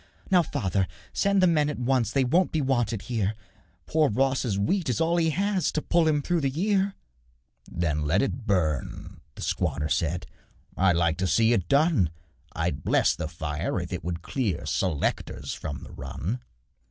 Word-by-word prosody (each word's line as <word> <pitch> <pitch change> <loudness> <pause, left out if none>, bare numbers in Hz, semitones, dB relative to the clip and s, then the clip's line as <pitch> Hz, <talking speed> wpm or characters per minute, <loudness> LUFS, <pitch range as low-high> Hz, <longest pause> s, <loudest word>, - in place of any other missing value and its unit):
'Now, 180 -2 +6
father, 95 - -1 0.3
send 200 -1 +2
the - - +8
men 155 -4 +3
at 150 - -4
once, 125 -1 +1
They 135 +2 +2
won't 170 +9 +2
be 160 - 0
wanted 120 -6 0
here; 110 -4 -1 0.5
Poor 155 -2 +2
Ross's 130 -2 +1
wheat 160 - 0
is 125 - 0
all 165 +1 +2
he 165 -1 +3
has 195 +3 0
To - - +1
pull 170 +1 +2
him 150 -2 +2
through 175 +1 +1
the 135 - +1
year.' 195 +6 +1 0.8
'Then 75 -3 -1
let 90 - +2
it 135 -3 -3
burn,' 80 -9 -1
the - - -7
squatter 75 +1 -1
said; 85 +2 0 0.5
'I'd 95 -2 +3
like 85 -1 +2
to 95 - +1
see 115 +4 +4
it 95 -7 0
done 140 - +3 0.4
I'd 80 -3 -2
bless - - +3
the - - -3
fire 80 -2 -3
if - - -5
it - - -4
would 85 0 -4
clear 115 - -2
Selectors 90 -7 -1
from 70 -4 -6
the - - -11
run. 115 - -4
120 Hz, 175 wpm, -26 LUFS, -, 0.8 s, the